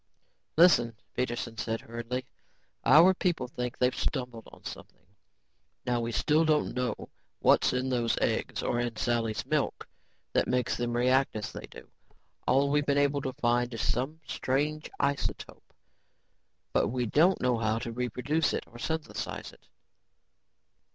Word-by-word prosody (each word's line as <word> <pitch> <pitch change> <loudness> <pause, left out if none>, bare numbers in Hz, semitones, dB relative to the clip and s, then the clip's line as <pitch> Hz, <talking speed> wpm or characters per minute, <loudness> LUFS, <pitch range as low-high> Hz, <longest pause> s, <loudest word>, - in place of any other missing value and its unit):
"Listen," 145 -10 +5 0.2
Peterson 120 -2 -3
said 115 -2 -2
hurriedly, 120 +2 -5 0.6
"our 175 +5 +7
people 175 -8 -1
think 125 -1 -4
they've 125 0 +2
stumbled 125 -5 -3
on - - -16
something. - - -10 0.8
Now 120 -1 +1
we 115 0 -2
still 150 +8 +3
don't 155 -2 +2
know 125 -1 -1 0.4
what's - - +4
in 125 +1 -1
those 120 -2 +1
eggs - - -1
or 120 - 0
in 120 -1 -2
Sally's 115 -2 -1
milk - - -1 0.5
that - - +2
make 125 0 0
them 120 0 -1
react 130 +2 +3
as 105 - -4
they - - -8
do. - - -13 0.6
All 140 +2 +3
we've 145 0 +1
been 140 0 +2
able 145 0 +2
to 130 -1 -3
find 120 -2 +1
is 100 -4 -2
some 135 +7 -1
strange 150 +4 -1
isotope 140 0 -2 1.0
but - - +3
we 125 +2 -1
don't 165 - +4
know 125 -2 +1
how 110 0 +1
to 115 0 -4
reproduce 125 +6 0
it - - -2
or 120 - -14
synthesize 160 +4 -4
it. - - -22
125 Hz, 150 wpm, -29 LUFS, 120-145 Hz, 1.0 s, our